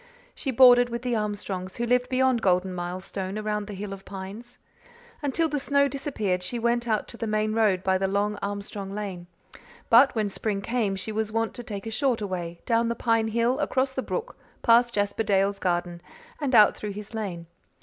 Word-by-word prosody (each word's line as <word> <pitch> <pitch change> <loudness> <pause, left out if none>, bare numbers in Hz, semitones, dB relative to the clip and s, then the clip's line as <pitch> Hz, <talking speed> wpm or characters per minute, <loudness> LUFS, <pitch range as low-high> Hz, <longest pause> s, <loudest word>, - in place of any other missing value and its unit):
She 275 - -5
boarded 245 -1 +7
with 235 +1 -4
the 245 -2 0
Armstrongs, 205 -3 -3
who 240 - -1
lived 250 +1 +2
beyond 260 -2 +2
Golden 185 -1 +2
Milestone 185 +2 -4
around 210 -1 -2
the 205 - -6
hill 195 +1 -5
of 195 0 -10
pines. 200 +6 -8 0.6
Until 295 +3 +1
the 295 -2 -2
snow 280 0 +2
disappeared 220 -10 -2
she 210 +7 -4
went 235 +1 0
out 215 -2 0
to 235 - -8
the 230 - -3
main 215 0 0
road 210 -5 +2
by 190 0 +2
the 195 - +1
long 205 +2 0
Armstrong 200 -1 -5
lane; 190 -4 -5 0.6
but 250 +4 +7
when 215 -2 +1
spring 200 0 -3
came 225 -4 0
she 195 +3 -5
was 215 0 -2
wont 225 0 -1
to - - -7
take 205 -3 -6
a 225 - -4
shorter 235 -2 0
way, 175 -3 -5
down 230 0 +2
the 235 - -1
pine 230 -2 +1
hill, 235 +3 +1
across 265 0 0
the 265 - -2
brook, 485 - -4 0.3
past 235 +1 +5
Jasper 205 +1 0
Dale's 200 -1 +1
garden, 175 -1 -1 0.4
and 275 -4 0
out 215 -2 +7
through 210 -1 -5
his 210 +2 -8
lane. 190 -6 -4
215 Hz, 200 wpm, -26 LUFS, 195-240 Hz, 0.6 s, boarded